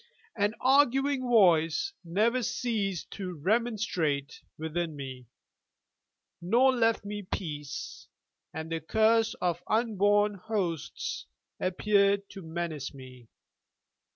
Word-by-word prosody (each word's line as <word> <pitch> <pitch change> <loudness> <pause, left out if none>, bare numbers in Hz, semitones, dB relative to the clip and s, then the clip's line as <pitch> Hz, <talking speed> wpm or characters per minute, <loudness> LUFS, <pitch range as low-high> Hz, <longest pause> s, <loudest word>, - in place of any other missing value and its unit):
An 205 0 +1
arguing 270 +1 +3
Voice 195 - +3
never 215 +9 +1
ceased 210 -6 -2
to 185 -3 -5
remonstrate 185 -6 -1 0.2
within 160 0 -3
me, 130 -3 -8 1.1
nor 240 +9 +4
left 225 -3 +2
me 205 0 -4
peace, 150 -7 -6 0.4
and 160 +1 -6
the 165 - -1
curse 220 +5 +3
of 175 -1 -1
unborn 205 -2 +2
hosts 185 -5 -3 0.3
appeared 200 +1 +2
to 195 - -9
menace 160 -4 -4
me. 125 -3 -12
195 Hz, 100 wpm, -29 LUFS, 160-225 Hz, 1.1 s, nor